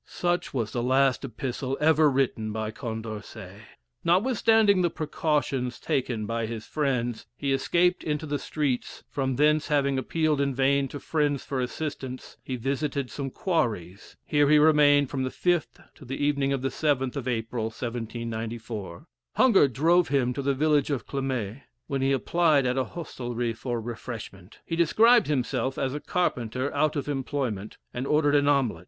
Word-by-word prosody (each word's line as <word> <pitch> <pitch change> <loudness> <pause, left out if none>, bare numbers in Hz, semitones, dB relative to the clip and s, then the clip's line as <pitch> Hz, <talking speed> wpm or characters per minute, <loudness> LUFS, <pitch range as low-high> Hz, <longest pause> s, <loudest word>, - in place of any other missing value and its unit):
'" - - -46 0.2
Such 175 0 +1
was 115 -5 -2
the 120 - -2
last 130 +2 +2
epistle 130 +1 -4
ever 155 0 +5
written 130 -5 0
by 110 0 -3
Condorcet. 110 -4 -7 0.4
Notwithstanding 215 +1 +4
the 175 - +2
precautions 150 -6 -1
taken 120 -5 -1
by 115 +1 -2
his 110 -1 -6
friends, 125 -6 -1
he 140 -1 0
escaped 175 +6 +2
into 150 0 -2
the 145 -1 -2
streets 140 -5 -2
from 135 -2 -1
thence 150 +2 +3
having 140 -2 +1
appealed 155 +1 0
in 140 -2 0
vain 135 +1 +2
to 145 - -7
friends 145 -3 0
for 135 -2 -2
assistance, 130 -1 -5
he 130 - -4
visited 135 +2 -2
some 140 -2 -4
quarries. 105 - -2
Here 145 -1 +3
he 150 - +6
remained 145 -2 +5
from 135 - -2
the 130 - -1
5th 175 +2 -1
to - - -16
the 135 +1 -5
evening 140 -1 +1
of 135 -2 -1
the 135 - +1
7th 135 -4 0
of 135 -3 -4
April, 115 -1 -2
1794. 115 - -5 0.3
Hunger 230 - +5
drove 165 +7 +3
him 130 -3 +1
to 140 - -3
the 140 0 0
village 150 0 +2
of 135 -6 -2
Clamait, 130 -4 -3 0.2
when 135 -1 -2
he 135 +1 +2
applied 150 +1 +2
at 125 0 +1
an 130 -1 0
hostelry 120 -8 -4
for 120 +1 -3
refreshment. 110 -4 -8
He 165 - -3
described 220 +7 +5
himself 130 -2 -1
as 135 -1 -1
a 150 - -3
carpenter 130 -6 -1
out 150 +2 +1
of 145 -1 -3
employment, 130 -7 -3 0.2
and 125 +2 -3
ordered 150 -1 +3
an 145 -1 +3
omelet. 135 - +2
135 Hz, 165 wpm, -26 LUFS, 120-150 Hz, 0.4 s, he